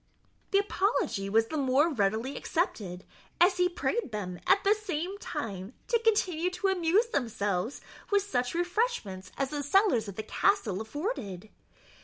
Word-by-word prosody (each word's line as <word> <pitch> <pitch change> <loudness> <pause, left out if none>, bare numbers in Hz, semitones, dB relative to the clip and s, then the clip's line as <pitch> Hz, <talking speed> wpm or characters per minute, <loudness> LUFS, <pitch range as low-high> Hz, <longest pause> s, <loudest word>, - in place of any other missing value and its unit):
The 395 - +3
apology 390 - 0
was 225 +2 +3
the 315 - -2
more 270 +3 +3
readily 225 +4 0
accepted, 200 - -2 0.4
as 360 +1 +5
he 360 0 +3
prayed 365 - -2
them, 185 -4 -4
at 400 - +5
the 400 - +5
same 390 -2 -4
time, 200 - -5
to 470 - +3
continue 365 -6 +2
to 370 +2 -1
amuse 380 +5 +2
themselves 225 - -1 0.3
with 405 -1 +3
such 250 -8 -1
refreshments 350 - -1
as 275 -1 -1
the 295 -1 -2
cellars 285 - +3
of 200 - -7
the 220 - -4
castle 220 - +1
afforded. 220 - -4
290 Hz, 150 wpm, -29 LUFS, -, 0.4 s, as